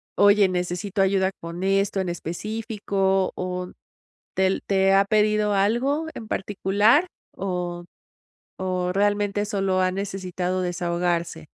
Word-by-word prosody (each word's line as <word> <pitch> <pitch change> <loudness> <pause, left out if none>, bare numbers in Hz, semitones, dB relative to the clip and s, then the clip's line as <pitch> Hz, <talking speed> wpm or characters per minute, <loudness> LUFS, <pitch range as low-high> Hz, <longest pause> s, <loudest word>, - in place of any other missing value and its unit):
"Oye, 205 -1 +5
necesito 180 +2 -1
ayuda 190 0 +2
con 170 +1 -7
esto 195 0 +1
en 185 -2 -1
específico", 195 +2 -1
o, 180 0 -4 0.6
¿tel 190 0 +1
te 195 -1 +3
ha 195 +1 +4
pedido 210 0 +2
algo 240 +10 +1
en 220 - -8
particular?, 205 - +2 0.3
o 180 -2 -3 0.8
o, 185 -1 -1
¿realmente 205 +1 +1
solo 195 -3 0
ha 185 0 +2
necesitado 185 -1 -3
desahogarse? 175 - -2
195 Hz, 115 wpm, -24 LUFS, 180-205 Hz, 0.8 s, Oye